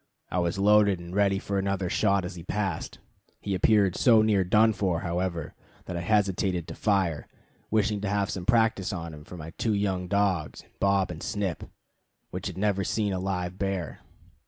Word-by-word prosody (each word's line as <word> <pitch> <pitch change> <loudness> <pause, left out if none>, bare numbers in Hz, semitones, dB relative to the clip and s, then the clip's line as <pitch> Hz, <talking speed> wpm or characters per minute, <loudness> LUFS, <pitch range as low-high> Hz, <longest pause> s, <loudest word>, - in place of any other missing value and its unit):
I 90 - 0
was 85 +1 0
loaded 100 -1 +4
and 85 +1 -9
ready 100 -1 +2
for 100 0 -2
another 95 -1 -1
shot 100 0 +1
as 90 - -5
he 85 - -9
passed. 95 -1 -3 0.4
He 100 - -3
appeared 100 0 +3
so 115 -4 +5
near 105 -3 +3
done 110 +5 +4
for, 90 -5 -1
however, 85 -2 -2 0.3
that 90 - -5
I 85 - -2
hesitated 95 -3 +1
to - - -5
fire, 95 -8 0 0.4
wishing 105 -1 +1
to 100 - -2
have 100 -1 0
some 90 -2 -5
practice 110 -5 +2
on 85 -4 -5
him 75 0 -10
for 90 - -10
my 80 0 -8
two 110 -2 +1
young 95 -3 -1
dogs 95 -5 0 0.2
Bob 100 -2 +2
and 85 -1 -8
Snip, 100 -6 -3 0.7
which - - -4
had - - -7
never 100 -1 +1
seen 105 0 0
a 95 - -2
live 90 -1 -3
bear. 95 -7 -3
95 Hz, 185 wpm, -27 LUFS, 90-100 Hz, 0.7 s, so